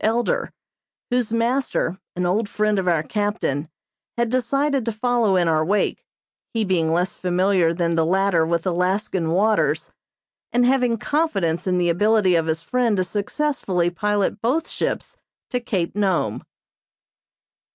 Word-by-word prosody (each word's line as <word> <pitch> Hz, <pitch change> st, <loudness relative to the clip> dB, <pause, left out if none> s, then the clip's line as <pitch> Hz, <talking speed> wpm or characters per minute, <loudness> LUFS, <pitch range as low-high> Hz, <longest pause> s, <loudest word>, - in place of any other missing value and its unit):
Elder," 230 Hz, +2 st, 0 dB, 0.6 s
whose 245 Hz, -3 st, 0 dB
master, 230 Hz, -5 st, 0 dB, 0.2 s
an 180 Hz, 0 st, -1 dB
old 205 Hz, +4 st, 0 dB
friend 210 Hz, -1 st, +1 dB
of 185 Hz, -, -3 dB
our 165 Hz, -3 st, +2 dB
captain, 205 Hz, -7 st, -2 dB, 0.5 s
had 235 Hz, -1 st, +1 dB
decided 275 Hz, +3 st, 0 dB
to 230 Hz, -, -1 dB
follow 225 Hz, -2 st, +1 dB
in 175 Hz, -2 st, +2 dB
our 155 Hz, -1 st, +2 dB
wake, 200 Hz, +6 st, -1 dB, 0.5 s
he 225 Hz, -, +1 dB
being 170 Hz, -4 st, +1 dB
less 180 Hz, +3 st, 0 dB
familiar 180 Hz, -1 st, +2 dB
than 170 Hz, 0 st, 0 dB
the 165 Hz, -1 st, +2 dB
latter 185 Hz, 0 st, +2 dB
with 165 Hz, 0 st, -1 dB
Alaskan 180 Hz, -1 st, 0 dB
waters, 210 Hz, +6 st, +1 dB, 0.6 s
and 245 Hz, 0 st, +3 dB
having 250 Hz, -2 st, +2 dB
confidence 200 Hz, -, -1 dB
in 180 Hz, -1 st, +2 dB
the 175 Hz, -1 st, +2 dB
ability 205 Hz, +2 st, +3 dB
of 165 Hz, -1 st, +1 dB
his 160 Hz, +1 st, -1 dB
friend 245 Hz, -2 st, +1 dB
to 185 Hz, -, +2 dB
successfully 200 Hz, -, -1 dB
pilot 205 Hz, +3 st, -1 dB
both 285 Hz, +8 st, 0 dB
ships -, -, -3 dB, 0.3 s
to 250 Hz, -, 0 dB
Cape 195 Hz, -9 st, -2 dB
Nome. 195 Hz, -4 st, 0 dB
200 Hz, 145 wpm, -22 LUFS, 175-230 Hz, 0.6 s, and